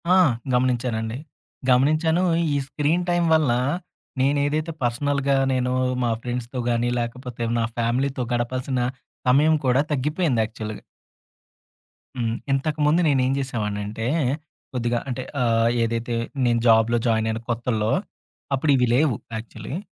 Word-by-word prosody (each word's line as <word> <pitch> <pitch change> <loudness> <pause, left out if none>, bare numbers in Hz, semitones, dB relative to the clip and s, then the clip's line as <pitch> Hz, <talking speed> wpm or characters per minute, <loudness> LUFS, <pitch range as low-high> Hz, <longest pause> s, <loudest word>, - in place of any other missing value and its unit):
ఆ! - - +6 0.4
గమనించానండి. 120 -2 0 0.5
గమనించాను 155 +7 +3 0.3
ఈ - - +2
స్క్రీన్ 155 +5 0
టైం 175 0 +2
వల్ల 155 -6 +3 0.7
నేనేదైతే 145 +4 +1
పర్సనల్‌గా 140 +3 +1 0.2
నేను 125 0 0 0.3
మా 120 - +1
ఫ్రెండ్స్‌తో 125 +1 -4
గానీ 120 0 +1
లేకపోతే 120 0 -5 0.2
నా 115 - +1
ఫ్యామిలీతో 125 +3 0
గడపాల్సిన 125 +2 -1 0.5
సమయం 150 +5 +5
కూడా 130 +2 +4
తగ్గిపోయింది 150 -2 +1
యాక్చువల్‌గా. 110 -1 -7 1.3
హ్మ్. 115 -2 -1 0.2
ఇంతకుముందు 150 +4 +2
నేనేం 130 -2 +2
జేసేవాడినంటే 110 -4 -3 0.7
కొద్దిగా 120 -1 0
అంటే 125 0 -3 0.2
ఆహ్, 115 -1 +3
ఏదైతే 115 +1 -2 0.3
నేను 120 -1 +2
జాబ్‌లో 115 +1 +5
జాయిన్ 110 -1 +2
అయిన 110 - -2
కొత్తల్లో 115 -2 0 0.6
అప్పుడు 145 +2 +1
ఇవి 125 -2 +3
లేవు 140 -4 +3 0.2
యాక్చువల్లీ. 110 +5 -7
125 Hz, 115 wpm, -23 LUFS, 115-140 Hz, 1.3 s, ఆ